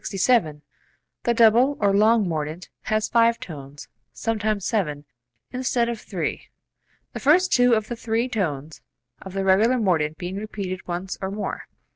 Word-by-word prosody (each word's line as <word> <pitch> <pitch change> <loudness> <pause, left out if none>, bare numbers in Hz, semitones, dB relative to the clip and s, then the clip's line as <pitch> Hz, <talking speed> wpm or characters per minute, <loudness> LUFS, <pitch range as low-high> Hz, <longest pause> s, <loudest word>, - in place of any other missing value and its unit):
42.] - - -20
67. 175 -9 +2 0.6
The 235 - +3
double 235 +5 +5
(or 200 -1 +2
long) 215 +1 +4
mordent 160 +1 -4 0.2
has 215 0 0
five 230 0 +3
tones 145 -3 -9 0.2
(sometimes 215 -3 -2
seven) 150 -10 -1 0.5
instead 250 -2 0
of 230 -2 -4
three, - - -4 0.7
the - - -5
first 355 +6 +4
two 245 -1 +5
of 215 -1 -2
the 240 - -4
three 230 +1 -1
tones 160 - -3 0.4
of 190 - -9
the 195 0 -1
regular 210 +7 +4
mordent 160 -8 +1
being 180 +2 -5
repeated 200 -3 -5
once 180 +2 -4
or 190 - -2
more. 205 +2 -5
210 Hz, 155 wpm, -23 LUFS, 175-230 Hz, 0.7 s, double